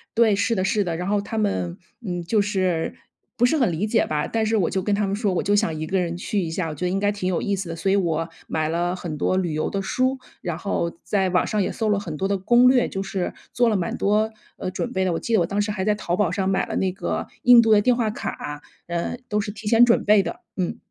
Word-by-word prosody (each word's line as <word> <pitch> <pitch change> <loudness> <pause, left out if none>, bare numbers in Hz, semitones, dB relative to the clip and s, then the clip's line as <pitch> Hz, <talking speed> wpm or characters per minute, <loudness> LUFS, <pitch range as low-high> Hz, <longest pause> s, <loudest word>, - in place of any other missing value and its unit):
对， 225 -3 +4
是 225 +4 +1
的 185 - 0
是 205 +2 +2
的， 170 -3 -2
然 180 +3 -4
后 205 0 +1
他 220 +2 -5
们， 90 - -1 0.3
嗯， 175 -2 -3
就 210 +5 +1
是 185 -5 -1 0.4
不 245 - +3
是 315 - +1
很 245 - +2
理 185 +7 -1
解 225 +1 +2
吧。 150 -1 -1
但 225 -1 -1
是 220 +1 +1
我 180 -5 +2
就 190 - -1
跟 205 +2 0
他 205 0 +1
们 195 - -1
说， 205 -3 0
我 - - 0
就 205 +1 +2
想 165 -5 +1
一 155 - -3
个 190 +2 +1
人 175 -1 -2
去 200 +3 -2
一 165 -2 -3
下， 165 -1 -2
我 150 - -6
觉 165 - -3
得 - - +1
应 190 +2 0
该 205 +1 +2
挺 200 -3 -3
有 185 -2 0
意 200 -1 0
思 185 -3 -5
的。 165 - -4
所 190 +4 0
以 - - +4
我 165 -4 0 0.2
买 155 -1 -1
了 175 +2 0
很 170 -4 -5
多 185 - +1
旅 175 -4 -1
游 155 - -1
的 195 - -1
书， 255 +7 0 0.2
然 175 -4 -3
后 170 -2 -1
在 190 -2 +1
网 180 - +2
上 210 -1 0
也 - - -2
搜 220 -2 -1
了 205 -1 +2
很 170 -7 -6
多 190 - -1
的 200 0 0
攻 240 +6 +5
略， 250 -2 +4
就 195 - -4
是， 195 -2 -3 0.2
做 240 -1 +3
了 215 - +1
蛮 180 -3 -1
多， 215 +2 +2 0.3
呃， 185 - -3
准 245 - -3
备 190 - +1
的， 185 - +1
我 165 - -1
记 230 - -3
得 220 - +5
我 170 - +2
当 200 - -2
时 210 - -1
还 190 -2 -2
在 210 0 +2
淘 175 -4 -2
宝 195 -4 +1
上 190 0 -1
买 190 - +1
了 - - -4
那 190 - +1
个 190 - -3 0.2
印 245 -1 +8
度 225 - +2
的 210 -1 +6
电 245 +3 +3
话 235 -3 0
卡， 145 -7 -5 0.3
嗯， 175 +7 -3
都 210 0 +1
是 205 0 -4
提 210 +1 -9
前 230 +2 +6
准 235 - +3
备 210 0 +5
的， 170 - -6 0.2
嗯。 180 -2 -2
195 Hz, 315 characters per minute, -23 LUFS, 175-215 Hz, 0.4 s, 印